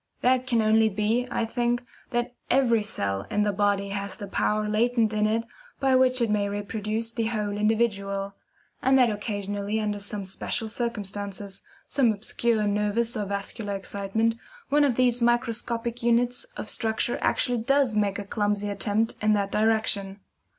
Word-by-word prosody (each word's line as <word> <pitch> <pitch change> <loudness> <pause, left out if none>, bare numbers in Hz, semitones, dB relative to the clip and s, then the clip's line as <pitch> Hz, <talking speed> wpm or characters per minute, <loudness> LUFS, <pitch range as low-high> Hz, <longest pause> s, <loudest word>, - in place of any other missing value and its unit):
That 255 +1 +2
can 235 -4 +2
only 220 0 +4
be, 215 +4 0
I 230 - 0
think, 240 +1 0 0.3
that 240 0 -1 0.2
EVERY 245 -4 +4
cell 100 - -2
in 210 - +1
the 205 - +2
body 200 0 +1
has 200 0 -4
the 205 - -6
power 210 +2 0
latent 225 +1 +2
in 215 0 +2
it 225 +1 +1 0.4
by 270 -1 +2
which 255 -1 +4
it 230 - 0
may 205 -1 +1
reproduce 215 +2 -2
the 230 -1 -1
whole 210 -3 -1
individual 200 -2 0 0.5
and 265 +1 +4
that 245 -3 +5
occasionally 205 0 -3
under 210 -1 -2
some 200 0 -3
special 220 +4 -3
circumstances 205 -4 -3 0.3
some 265 -5 +3
obscure 220 +1 0
nervous 210 +3 +1
or 210 -2 -1
vascular 200 +1 -3
excitement 200 +3 -1 0.4
one 295 +1 +4
of 260 -4 +1
these 245 -1 +2
microscopic 235 0 0
units 240 - +2
of - - -5
structure 220 +1 -1
actually 245 -1 +1
does 270 0 +2
make 205 -1 +1
a 205 - -4
clumsy 205 0 0
attempt 210 +2 0
in 215 0 +3
that 200 -1 0
direction. 215 -2 +1
215 Hz, 160 wpm, -26 LUFS, 205-235 Hz, 0.5 s, that